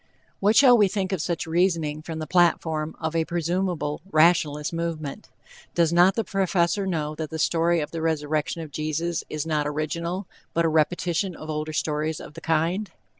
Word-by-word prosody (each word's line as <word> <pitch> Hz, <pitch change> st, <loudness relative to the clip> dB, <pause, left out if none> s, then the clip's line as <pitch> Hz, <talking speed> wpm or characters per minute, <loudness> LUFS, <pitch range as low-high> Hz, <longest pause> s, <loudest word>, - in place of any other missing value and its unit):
What 205 Hz, +3 st, +3 dB
shall 255 Hz, -2 st, +8 dB
we 205 Hz, -, +6 dB
think 190 Hz, -1 st, -2 dB
of 190 Hz, -5 st, -1 dB
such 170 Hz, -1 st, -2 dB
reasoning 165 Hz, -3 st, +1 dB
from 160 Hz, 0 st, -6 dB
the 155 Hz, -, -4 dB
platform 160 Hz, -2 st, +1 dB
of 160 Hz, 0 st, -3 dB
a 165 Hz, -, +2 dB
presumable 170 Hz, -2 st, -2 dB
rationalist 155 Hz, -3 st, +3 dB
movement? 165 Hz, -4 st, -4 dB, 0.5 s
Does 170 Hz, -1 st, +3 dB
not 175 Hz, +3 st, +5 dB
the 225 Hz, -, 0 dB
Professor 195 Hz, -1 st, 0 dB
know 155 Hz, -4 st, -2 dB
that 155 Hz, 0 st, -5 dB
the 160 Hz, -, -5 dB
story 170 Hz, +1 st, +2 dB
of 150 Hz, -, -5 dB
the 165 Hz, -, -4 dB
resurrection 155 Hz, 0 st, -1 dB
of 155 Hz, -, -10 dB
Jesus 155 Hz, +3 st, -2 dB
is 155 Hz, 0 st, -3 dB
not 150 Hz, -2 st, 0 dB
original, 170 Hz, +5 st, -3 dB, 0.3 s
but 170 Hz, 0 st, +3 dB
a -, -, +3 dB
repetition 170 Hz, +3 st, 0 dB
of 155 Hz, 0 st, -7 dB
older 155 Hz, 0 st, -3 dB
stories 155 Hz, 0 st, -1 dB
of -, -, -10 dB
the 165 Hz, -, -10 dB
kind? 165 Hz, +6 st, 0 dB
165 Hz, 180 wpm, -25 LUFS, 155-175 Hz, 0.5 s, shall